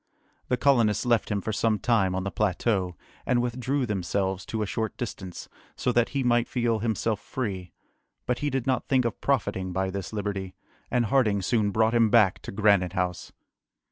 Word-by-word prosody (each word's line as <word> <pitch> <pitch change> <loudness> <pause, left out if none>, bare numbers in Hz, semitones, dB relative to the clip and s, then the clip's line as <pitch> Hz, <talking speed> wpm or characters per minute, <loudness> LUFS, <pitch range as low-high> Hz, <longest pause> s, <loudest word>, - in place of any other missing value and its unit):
The 125 - +1
colonists 120 -6 +3
left 120 -2 +2
him 105 -2 -1
for 110 - -3
some 110 +2 +1
time 100 -6 +1
on 95 - -1
the 100 - -3
plateau, 95 -2 0 0.3
and 125 - +1
withdrew 125 +3 -1
themselves 95 -2 -2
to 110 -1 -2
a - - -1
short 110 +2 -3
distance, 95 -6 -6 0.3
so 125 - 0
that 120 -1 +2
he 140 -1 -1
might 120 -1 +2
feel 120 -3 0
himself 110 -1 -1
free; 95 -8 -4 0.5
but 125 - -1
he 145 - 0
did 135 -3 -2
not 130 -1 0
think 130 -2 +2
of 115 - -3
profiting 100 -9 0
by 95 +1 -1
this 100 0 -5
liberty, 100 -3 -4 0.3
and 120 -1 +1
Harding 105 -5 +2
soon 105 0 +1
brought 110 +2 +2
him 115 -2 +4
back 105 -5 +4
to - - -7
Granite 100 -3 +3
House. 90 -2 -2
110 Hz, 185 wpm, -26 LUFS, 95-120 Hz, 0.5 s, him